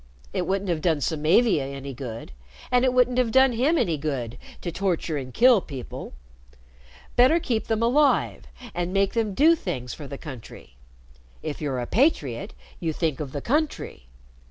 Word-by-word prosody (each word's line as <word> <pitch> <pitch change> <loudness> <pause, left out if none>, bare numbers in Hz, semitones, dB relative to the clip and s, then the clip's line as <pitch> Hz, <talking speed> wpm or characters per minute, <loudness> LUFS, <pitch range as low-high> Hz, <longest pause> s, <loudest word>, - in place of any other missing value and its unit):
It - - -1
wouldn't 195 -1 0
have 160 -2 -1
done 160 -3 +2
Samavia 160 - +2
any 140 0 -6
good, 120 - -7 0.4
and 250 0 +4
it 260 - +3
wouldn't 250 0 +3
have 240 -3 +1
done 265 +2 +5
him 265 +8 +2
any 165 - +1
good 135 -6 -4 0.2
to 175 - -3
torture 175 -3 -1
and 130 -3 -5
kill 240 - +5
people. 135 -7 -8 1.0
Better 260 +7 +5
keep 235 -8 -2
them 225 0 0
alive 275 +4 +2 0.3
and 175 +1 -2
make 195 0 +2
them 220 -4 -1
do 320 - +6
things 130 - -5
for 145 - -8
the 140 - -7
country. 130 - -11 0.7
If 155 -1 -5
you're 140 -4 -2
a 120 - -2
patriot, 150 - 0 0.2
you 165 -2 -2
think 155 -3 -1
of 145 -4 -5
the 145 - -4
country." 290 - -2
175 Hz, 170 wpm, -25 LUFS, -, 1.0 s, do